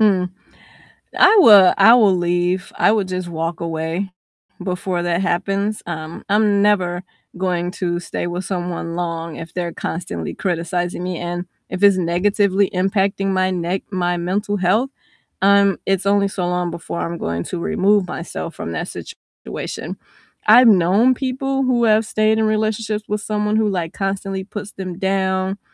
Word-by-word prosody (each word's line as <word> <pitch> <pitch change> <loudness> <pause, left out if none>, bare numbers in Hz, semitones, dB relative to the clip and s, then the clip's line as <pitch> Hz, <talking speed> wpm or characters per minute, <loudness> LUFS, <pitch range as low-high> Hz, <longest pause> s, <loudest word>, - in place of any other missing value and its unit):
Mm, 190 -4 +3 0.9
I 445 - +7
would 200 - +8
I 230 - +7
will 210 -6 +5
leave, 175 +1 -1
I - - +4
would 205 -4 0
just 185 -1 -4
walk 165 0 -3
away 165 +3 -3 0.5
before 180 -1 -2
that 175 0 0
happens, 195 +3 -1
um, 160 -1 -6
I'm 205 0 +3
never 185 -4 +1 0.3
going 180 -1 -1
to 175 -3 -2
stay 175 - -4
with 175 +2 -4
someone 175 -2 -4
long 165 -2 -4
if 165 0 -9
they're 175 -2 -3
constantly 85 - -5
criticizing 175 0 -2
me 180 -2 -3
and 175 +1 -4 0.2
if 185 - -5
it's 200 -2 +6
negatively 195 +3 +1
impacting 195 +1 0
my 185 -1 +1
ne 180 +2 -2
my 175 -1 0
mental 200 +4 -1
health, 210 +8 +1 0.5
um, 200 -1 +4
it's 195 0 0
only 200 0 +3
so 190 -2 -3
long 180 -1 -1
before 170 0 -5
I'm 170 0 -3
going 85 - -3
to 180 - -5
remove 195 +2 +2
myself 165 -1 -6
from 85 - -5
that 80 - -4
situation. - - -8 0.5
I've 240 +4 +8
known 205 +5 +5
people 270 +1 -2
who 250 -2 +2
have 220 0 +4
stayed 215 +1 +1
in 220 - +2
relationships 215 0 -1
with 210 0 -2
someone 210 0 -1
who, 220 -1 +2
like, 175 -4 -2
constantly 195 0 -3
puts 205 +1 -8
them 185 -2 -6
down 190 0 0
190 Hz, 160 wpm, -20 LUFS, 175-205 Hz, 0.9 s, would